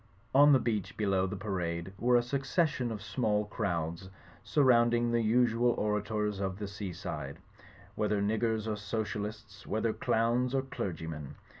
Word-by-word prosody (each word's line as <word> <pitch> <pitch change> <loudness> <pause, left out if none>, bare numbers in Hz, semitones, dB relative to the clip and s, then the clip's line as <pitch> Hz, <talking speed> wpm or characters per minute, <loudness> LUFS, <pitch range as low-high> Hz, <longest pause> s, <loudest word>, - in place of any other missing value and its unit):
On 145 +2 +7
the 135 - +7
beach 110 -6 -2
below 95 -3 +1
the 95 - -4
parade 90 -3 -3
were 125 +1 +3
a 120 - +4
succession 135 0 0
of 105 -2 -5
small 105 -3 0
crowds, 85 -4 -3 0.3
surrounding 120 -4 +3
the 120 0 +2
usual 120 +1 +3
orators 105 -1 -1
of 95 -1 -2
the 105 0 -4
seaside; 90 -8 -6 0.6
whether 105 -1 0
niggers 110 +1 0
or 110 -1 -2
socialists, 105 0 -5
whether 110 +1 0
clowns 120 +3 +1
or 135 - +1
clerg3rmen. 80 - -5
110 Hz, 140 wpm, -31 LUFS, 100-120 Hz, 0.6 s, On